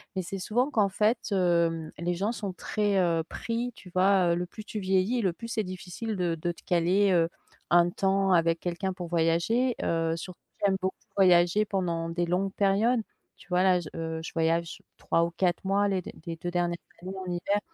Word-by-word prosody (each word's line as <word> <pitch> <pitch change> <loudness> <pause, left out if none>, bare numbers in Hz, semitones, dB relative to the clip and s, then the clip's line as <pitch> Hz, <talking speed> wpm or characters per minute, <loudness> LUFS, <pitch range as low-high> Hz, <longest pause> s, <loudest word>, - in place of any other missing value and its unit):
mais 190 - 0
c'est 195 +3 -5
souvent 240 +8 0
qu'en 210 -8 +3
fait, 215 +5 +2
hem, 170 -4 +1
les 175 +2 -1
gens 195 +5 -1
sont 205 -5 -4
très, 205 +3 0
heu, 165 -2 +2
pris 235 +5 -3
tu 185 - -14
vois? 185 -1 +3
Heu, - - +1
le 175 - -2
plus 215 +5 -10
tu 215 - -6
vieillis 190 +4 +1
et 235 - +1
le 180 -3 +1
plus 230 +7 -8
c'est 220 -2 -1
difficile 185 +4 -5
de 175 -3 0
de 175 +2 -2
te 170 - -14
caler, 180 +4 +2
heu, 170 -2 +4 0.4
un 175 0 +6
temps 195 +1 +1
avec 165 -1 +3
quelqu'un 180 +2 -2
pour 180 -2 -6
voyager, 170 +10 +1
heu, 165 0 0
surtout 180 +2 -8 0.3
j'aime 195 -1 +3
beaucoup 190 0 -2 0.2
voyager 180 +1 +5
pendant 170 -5 -2
des 175 +1 -1
longues 185 +3 0
périodes. 210 +5 +2 0.4
Tu - - -18
vois 180 0 +2
là 185 -1 +4
j 170 - -7
heu, 160 0 -3
je 160 - -7
voyage 165 +1 0 0.2
3 165 - +1
ou 170 - -1
4 175 0 0
mois 200 +1 +2
les 190 -2 0 0.2
les 165 -1 -4
2 175 +2 -5
dernières 175 -1 0 0.3
années 185 +2 -6
en 180 - -4
hiver. 200 +4 0
180 Hz, 210 wpm, -28 LUFS, 170-200 Hz, 0.4 s, un